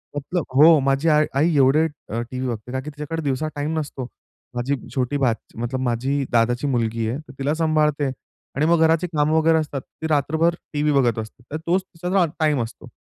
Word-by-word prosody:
मतलब 155 +4 -2
हो 155 +3 +8
माझी 135 +4 +1
आ 150 - +5 0.2
आई 160 +2 +3
एवढे 140 +3 +4 0.2
अ, 115 +2 -2
टीव्ही 130 0 -3
बघते 115 +1 -5
कारण 130 0 -3
की 150 - -6
तिच्याकडे 150 +2 -5
दिवसा 140 +2 -1
टाईम 150 +2 -2
नसतो. 135 -4 -5 0.5
माझी 125 +4 0 0.2
छोटी 130 +2 0
भाची 120 -6 -2
मतलब 120 +2 -2
माझी 130 +3 0
दादाची 120 +3 +2
मुलगी 115 -3 0
आहे 125 - -2
तर 155 -4 -13
तिला 140 +2 0
सांभाळते 155 -3 +1 0.5
आणि 145 +3 +1
मग 170 +1 +4
घराची 165 +2 +2
कामं 155 -2 +1
वगैरे 160 0 +4
असतात. 145 -3 -2
ती 160 - -8
रात्रभर 160 +3 +2 0.2
टीव्ही 150 0 +1
बघत 120 -5 +2
असते. 110 +2 -9
तर 155 - -2
तोच 180 +3 +3
तिचा 180 -1 -7
हा 180 - +5
टाईम 150 -5 +2
असतो. 115 - -10
145 Hz, 200 wpm, -22 LUFS, 130-155 Hz, 0.5 s, हो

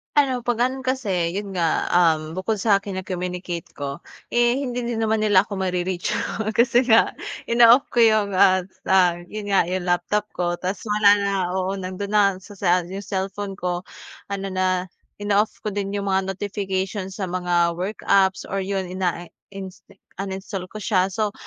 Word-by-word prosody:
Ano, 260 -4 +2
pag 240 -1 -1
ano 265 0 -6
kasi, 200 -11 0
yun 200 0 -5
nga, 165 -2 +1
um, 160 -2 +2
bukod 205 +3 -1
sa 205 0 +4
akin, 195 -1 -3
yung 185 - -10
communicate 180 -2 -4
ko, 140 -1 -6 0.2
eh, 240 +2 +2
hindi 250 -3 -3
din 235 -1 -2
naman 220 -1 +1
nila 205 -1 +4
ako 200 - -5
ma-re-reach, 180 -1 -1 0.4
kasi 240 +2 +3
nga 230 -2 +4 0.3
inooff 235 +2 +6
ko 235 - +6
yun 215 -3 +3
nga, 185 0 +5 0.3
ah, 180 -2 +5 0.2
yun 210 -1 -5
nga, 195 -1 +4
yung 180 +1 -3
laptop 190 +4 0
ko, 175 -1 -1
tas 185 +2 -3
wala 210 -1 +5
na, 200 -1 -1 0.2
oo, 190 +1 -1
nandun 185 +2 -5
na, 200 -2 +4
sa 205 -3 -13
sa 180 -1 +3
yung 190 +3 -7
cellphone 195 0 -4
ko, 180 0 -3 0.4
ano 195 -1 -4
na, 185 -1 +1 0.4
inooff 205 +1 +1
ko 210 - -2
din 200 0 -3
yung 200 -1 -1
mga 190 0 +1
notifications 195 -1 -3
sa 200 - -4
mga 175 -1 +1
work 200 +4 -4
apps 190 -1 +3
or 195 - -3
yun 190 -1 -3
ina-insta 185 +2 -6 0.3
uninstalled 195 -1 -5
ko 215 - -9
siya. 190 -3 +1
So, 205 +2 -2
195 Hz, 175 wpm, -23 LUFS, 185-210 Hz, 0.4 s, inooff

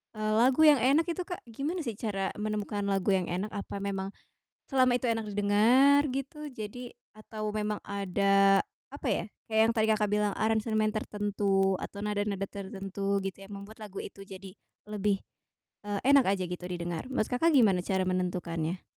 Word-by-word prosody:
eee, 215 0 -1
lagu 255 +5 +4
yang 295 -3 +7
enak 275 +7 +4
itu, 350 +1 -2
Kak, 355 - -6
gimana 295 +9 -3
sih 235 -6 -4
cara 195 -4 -2
menemukan 210 -1 -2
lagu 195 0 +1
yang 185 -2 -1
enak, 185 +5 -3
apa 200 -1 -5
memang 195 -1 -3 0.6
selama 255 -2 +4
itu 245 - -3
enak 225 -1 -1
didengar, 230 +8 +5
gitu, 285 +3 -5
jadi 235 +3 -7 0.2
atau 215 0 -5
memang 210 0 -1
ada, 195 0 +3 0.3
apa 285 - -4
ya, - - 0 0.3
kayak 220 0 +3
yang - - +1
tadi 220 -1 +2
Kakak 210 -1 +1
bilang, 210 -1 +1
aransemen 220 0 +1
tertentu 200 -2 0
atau 200 - -7
nada-nada 205 -1 -1
tertentu 195 0 -3
gitu, 195 0 -4
yang 195 - -12
membuat 215 +2 -13
lagu 200 -2 -8
itu 195 - -10
jadi 190 0 -10 0.4
lebih, 205 -1 0 0.7
eee, 205 -1 -1
enak 280 -2 +7
aja 185 - -3
gitu, 180 0 -6
didengar, 175 +3 -4
menurut 260 -5 0
Kakak 320 +7 +3
gimana 200 -9 +5
cara 190 0 0
menentukannya? 180 -2 -2
205 Hz, 170 wpm, -29 LUFS, 195-225 Hz, 0.7 s, yang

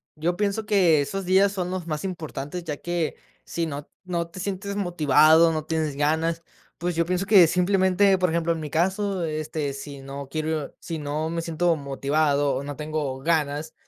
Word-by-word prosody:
Yo 165 +3 -1
pienso 205 +2 -1
que 180 -8 +4
esos 195 +7 -3
días 190 +2 +4
son 185 -3 -3
los 185 -2 -4
más 155 -1 -3
importantes, 170 -3 -5
ya 150 -3 -4
que 175 -1 -2 0.3
si 170 - -2
no 145 -1 -6 0.2
no 170 -2 -2
te 175 - -10
sientes 200 +1 -4
motivado, 165 -3 +5
no 155 -1 -3
tienes 155 -3 -1
ganas, 160 +3 +1 0.4
pues, 175 +1 -2
yo 170 0 +2
pienso 180 +2 -1
que 195 -3 +7
simplemente, 190 +2 +3
por 180 -1 +1
ejemplo, 170 +1 0
en 165 - -5
mi 150 - -5
caso, 190 +4 0
este, 155 -2 -3
si 140 0 -8
no 135 +1 -7
quiero 155 0 -3
si 165 -2 -5
no 150 +2 -2
me 165 0 -2
siento 165 +1 +1
motivado 140 0 0
o 135 - -3
no 145 0 -6
tengo 150 -3 -3
ganas 155 0 0
165 Hz, 185 wpm, -25 LUFS, 150-180 Hz, 0.4 s, que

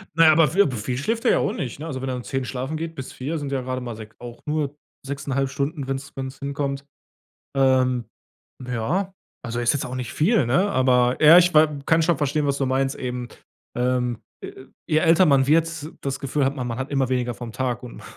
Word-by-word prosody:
Na 165 0 +6
ja, 155 - +8
aber, 155 0 +5
vi 195 - +5
aber, 140 -10 +1
viel 120 +3 -3
schläft 225 - -2
er - - +5
ja - - +4
auch - - 0
nicht, 130 -1 -5
ne? 160 - -6
Also, 130 -5 -5
wenn 135 - -3
er 130 - -2
um 125 - -6
10:00 135 +1 -3
schlafen 130 +5 -4
geht 165 +1 -5
bis 130 -4 -7
4:00, 145 +6 -4
sind 145 -2 -5
ja 135 -2 -1
grade 130 0 -4
mal 120 -2 -5
sech 110 -1 -9
auch 120 -1 -10
nur 150 -2 -1 0.3
6,5 135 -1 -2
Stunden, 140 +1 -3
wenn's 135 +1 -4
wenn's 135 0 -6
hinkommt. 140 0 -3 0.7
Ähm, 130 -2 +3 0.6
ja, 145 - -1 0.3
also, 120 0 -3
ist 120 0 +3
jetzt 145 - -2
auch 125 - -6
nicht 125 -3 -4
viel, 180 - +2
ne? 180 - +2
Aber 125 -4 +3
ja, 160 +3 +10
ich 180 0 +4
wa 155 +1 +7 0.2
kann 165 0 +4
schon 165 -2 +2
verstehen, 145 +1 0
was 140 0 0
du 135 - 0
meinst 135 +1 0
eben, 125 -1 -4 0.5
ähm, 125 -1 0 0.2
äh, 130 - -9 0.2
je 155 - +2
älter 165 +3 +5
man 135 -3 +4
wird, 160 0 +1
das 135 -1 -3
Gefühl 140 +1 0
hat, 135 +1 0
man 125 -2 -3
man 115 -1 -4
hat 130 +1 -4
immer 135 -3 +1
weniger 125 -1 -1
vom 120 -1 -8
Tag 125 0 -2
und 125 - -10
135 Hz, 230 wpm, -23 LUFS, 125-150 Hz, 0.7 s, ja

